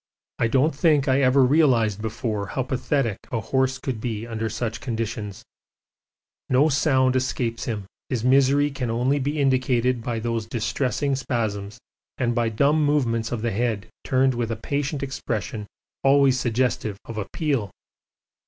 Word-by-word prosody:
I 115 - +3
don't 135 +7 +2
think 150 -1 +3
I 135 +1 +3
ever 135 +1 +5
realised 125 -8 +3
before 110 -2 -3
how 130 - -2
pathetic 130 -3 -1
a 115 - 0
horse 130 +3 0
could 130 -4 -4
be 115 -2 -3
under 115 -1 -3
such 115 +1 -3
conditions; 110 -4 -4 1.1
no 135 +5 +4
sound 130 -3 +2
escapes 125 -2 -1
him, 105 -4 -3 0.2
his 120 -4 -1
misery 140 +3 +4
can 130 -3 -3
only 125 +5 +1
be 145 +3 -2
indicated 130 -3 +2
by 120 -2 -2
those 115 -1 -2
distressing 130 +4 -1
spasms 110 -5 -3 0.4
and 120 -2 0
by 120 -1 +1
dumb 140 +7 +2
movements 120 -6 +1
of 120 -3 -3
the 115 - 0
head 115 0 -1
turned 130 -1 +2
with 120 -1 -2
a 115 - -1
patient 140 +4 -2
expression 110 -5 -4 0.4
always 135 -1 +4
suggestive 120 -4 0
of 115 -2 -5
appeal. 125 0 -1
125 Hz, 150 wpm, -24 LUFS, 115-135 Hz, 1.1 s, ever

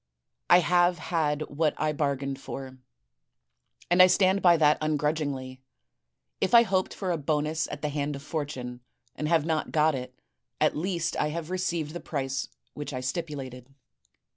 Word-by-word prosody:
I 175 +1 +8
have 175 +2 +3
had 155 -2 -1
what 155 +1 -1
I 155 0 0
bar 145 -2 0
gained 135 0 -5
for; 130 -1 -8 1.1
and 175 +1 +6
I 185 - +10
stand 190 +1 +3
by 175 -2 +6
that 150 -1 +4
ungrudgingly. 150 -4 -2 0.8
If 235 - +2
I 235 - +9
hoped 190 -4 0
for 190 -3 -2
a 170 - 0
bonus 155 +2 -1
at 145 - -8
the 150 - 0
hand 145 0 -2
of 140 - -9
Fortune 135 -6 -5 0.3
and 150 - -3
have 160 -2 +2
not 160 -2 -1
got 155 0 +3
it, 125 -1 -6 0.4
at 155 - +2
least 170 0 -1
I 150 - +1
have 165 +2 -5
received 170 -5 -1
the 175 - -5
price 135 -5 -3 0.3
which 145 -1 -6
I 130 - -3
stipulated.' 135 -3 -5
150 Hz, 165 wpm, -27 LUFS, 140-170 Hz, 1.1 s, I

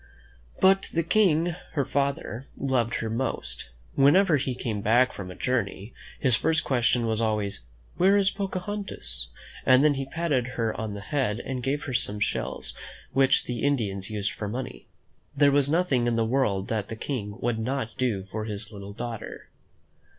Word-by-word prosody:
But 195 +1 +4
the 165 - +1
King, 170 -3 +3 0.2
her 140 -4 +1
father, 140 -2 -2
loved 125 -4 +1
her 110 - -2
most. 65 - -3 0.2
Whenever 155 +4 +5
he 130 -2 -2
came 110 -5 -3
back 120 +5 +4
from 95 -2 -7
a 90 - -8
journey, 110 -4 -2 0.3
his 130 -4 +3
first 155 +7 +1
question 120 -2 +2
was 110 0 0
always, 105 - -1 0.3
"Where 195 +3 +5
is 200 -1 +3
Pocahontas?" 195 - -3 0.4
And 130 +1 +6
then 150 - +5
he 135 -1 -3
patted 145 -6 0
her 115 -2 +1
on 110 -2 -4
the 100 - -6
head 110 0 -1
and 130 -1 -4
gave 140 +4 -1
her 130 - -4
some 105 -4 0
shells - - -1 0.4
which 135 +1 +4
the 120 -1 -4
Indians 105 -9 0
used 105 -2 -1
for 105 - -5
money. 120 +6 -5 0.5
There 140 0 +6
was 140 0 +3
nothing 145 -7 +2
in 120 - +2
the 115 -1 +2
world 110 -6 +1
that 110 -3 -1
the 115 - -5
King 110 -4 -4
would 120 -1 0
not 115 -1 -2
do 115 -7 0
for 110 +1 -3
his 105 0 -5
little 100 -1 -8
daughter. 115 0 -6
125 Hz, 170 wpm, -27 LUFS, 110-140 Hz, 0.5 s, And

